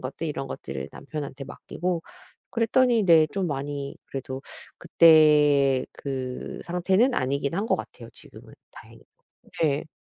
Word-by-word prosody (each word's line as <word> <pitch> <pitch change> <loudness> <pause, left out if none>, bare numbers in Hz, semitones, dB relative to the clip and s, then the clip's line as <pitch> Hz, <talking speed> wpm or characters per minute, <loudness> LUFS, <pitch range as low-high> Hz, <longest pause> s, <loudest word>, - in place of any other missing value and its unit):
것들 135 +5 -5
이런 150 -3 -4
것들을 65 - -6
남편한테 140 -2 -7
맡기고 175 +4 -4 0.5
그랬더니 230 0 +2
네 165 -3 +6
좀 195 -2 -1
많이 140 -1 -4
그래도 135 0 -6 0.4
그때 150 -4 +5
그 130 -2 -6
상태는 190 +8 +2
아니긴 140 +3 -1
한 200 +5 -1
것 - - +2
같아요, - - -10
지금은 - - -15 0.2
다행히도. - - -15 0.6
네. 150 -1 +1
150 Hz, 280 characters per minute, -25 LUFS, 135-175 Hz, 0.6 s, 네